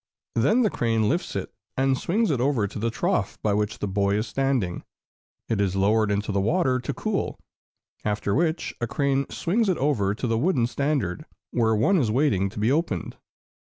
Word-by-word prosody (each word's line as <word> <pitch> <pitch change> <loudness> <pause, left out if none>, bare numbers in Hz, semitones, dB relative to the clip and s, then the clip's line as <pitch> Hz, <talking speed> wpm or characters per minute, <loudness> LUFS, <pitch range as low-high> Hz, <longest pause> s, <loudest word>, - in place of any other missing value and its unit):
Then 145 - +3
the 215 - +2
crane 115 -2 +1
lifts 170 - -1
it - - -4 0.2
and 135 0 +3
swings 200 - 0
it 130 -4 0
over 130 -5 +2
to 100 - -7
the 115 +2 0
trough 115 - -1
by 105 - +2
which 105 +1 -1
the 105 - -3
boy 100 +1 +1
is 105 +2 0
standing. 130 -10 -1 0.6
It 110 -3 0
is 95 -2 0
lowered 105 +2 +3
into 105 +1 -1
the 100 -1 +1
water 130 - +2
to 125 - -3
cool, - - -2 0.7
after 105 -1 -1
which 160 +2 0
a 120 - 0
crane 140 +2 0
swings 210 +5 0
it 185 - +1
over 110 -8 +1
to 120 - -4
the 115 -1 +1
wooden 140 -6 +2
standard, 125 -6 -1 0.3
where 110 -2 +2
one 170 - +3
is 120 -7 +1
waiting 105 -6 +2
to 100 - -13
be 110 +4 +2
opened. 140 - -1
115 Hz, 190 wpm, -25 LUFS, 105-145 Hz, 0.7 s, Then